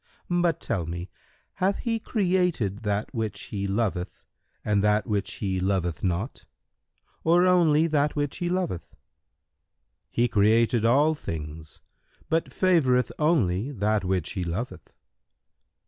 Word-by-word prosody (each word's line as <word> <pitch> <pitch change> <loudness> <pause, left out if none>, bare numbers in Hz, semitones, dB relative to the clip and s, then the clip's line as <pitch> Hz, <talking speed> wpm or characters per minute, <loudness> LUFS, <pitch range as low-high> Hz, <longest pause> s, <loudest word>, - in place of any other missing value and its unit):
But 175 -1 +2
tell 85 -4 -2
me, 85 +2 -6 0.5
hath 195 +2 +2
He 230 -2 -1
created 180 - 0
that 105 +2 -2
which 110 -3 -3
He 100 -1 -4
loveth 95 -3 -2 0.4
and 105 -1 +2
that 105 0 +2
which 105 -4 -2
He 95 -3 -2
loveth 90 -3 -1
not 95 +7 -2 0.8
or 175 +2 +4
only 165 -4 +4
that 150 -2 +1
which 145 -2 -2
He 175 -2 -2
loveth?"—"He 85 - -5
created 115 +2 +3
all 145 +7 +4
things, 80 - -7 0.5
but 165 +1 +2
favoureth 140 -10 +2
only 125 - +2
that 105 -3 0
which 90 -3 -1
he 95 -4 -3
loveth." 90 +9 -5
110 Hz, 120 wpm, -26 LUFS, 95-160 Hz, 0.8 s, or